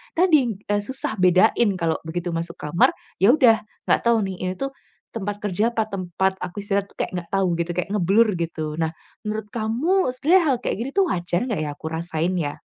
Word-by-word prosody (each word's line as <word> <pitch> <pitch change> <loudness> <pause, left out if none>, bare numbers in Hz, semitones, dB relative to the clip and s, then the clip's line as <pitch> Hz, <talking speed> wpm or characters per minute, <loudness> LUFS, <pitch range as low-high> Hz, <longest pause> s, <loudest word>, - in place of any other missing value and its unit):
tadi, 295 - +3
eee, 205 - +2
susah 220 -1 -3
bedain 190 +4 +4
kalau 165 -1 0
begitu 175 +1 -3
masuk 165 +1 -3
kamar 150 +3 +3 0.3
ya 215 +8 +6
udah 240 -7 +5 0.3
gak - - +5
tahu 230 -3 +4
nih 190 -2 -4
ini 185 - -2
tuh, 275 +8 -3 0.4
tempat 205 -1 -3
kerja 205 +3 +1
apa 220 -1 +1
tempat 190 0 -1
aku 180 +2 -6
istirahat 200 -1 -1
tuh - - -25
kayak - - -3
gak - - -30
tahu 190 -3 +2
gitu, 170 - -1
kayak 180 - 0
ngeblur 210 +3 +3
gitu. 160 -2 -3
Nah, 160 - +1 0.4
menurut 215 0 -3
kamu 255 - +1
sebenarnya 335 +8 +4
hal 265 - +3
kayak - - -1
gini 255 - -3
tuh 390 - +4
wajar 175 +1 -1
gak 205 -9 -1
ya 150 - -2
aku - - -12
rasain 165 +1 -1
ya? 145 -3 -3
195 Hz, 205 wpm, -23 LUFS, 175-230 Hz, 0.4 s, ya